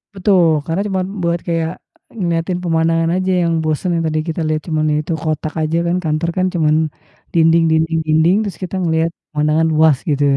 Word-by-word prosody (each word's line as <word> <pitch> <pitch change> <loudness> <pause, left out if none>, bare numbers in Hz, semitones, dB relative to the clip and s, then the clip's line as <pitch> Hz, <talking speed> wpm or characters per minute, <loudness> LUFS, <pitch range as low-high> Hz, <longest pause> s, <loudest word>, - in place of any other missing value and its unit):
Betul, 190 -1 +3 0.2
karena 165 +4 -1
cuman 190 -1 -1 0.2
buat 170 0 0
kayak 165 -1 -1 0.5
ngeliatin 170 0 -1
pemandangan 165 -1 +1
aja 185 0 0 0.2
yang 165 - 0
bosan, 155 +3 -1
yang 165 - 0
tadi 155 0 -1
kita 165 +1 -2
lihat 155 0 -1
cuma 155 -2 0
ya - - +1
itu 165 - -4
kotak 155 0 -2
aja 155 +2 0
kan, 175 - +1
kantor 155 +1 -1
kan, 185 - +2
cuman 155 -3 +2 0.6
dinding 165 0 +4
dinding 160 +1 +1
dinding, 160 +4 +3
terus 200 -5 -5
kita 185 +1 -4
ngelihat 165 0 +1 0.2
pemandangan 150 +2 +1
luas 155 -3 +4
gitu. 145 0 +1
165 Hz, 185 wpm, -17 LUFS, 155-170 Hz, 0.6 s, dinding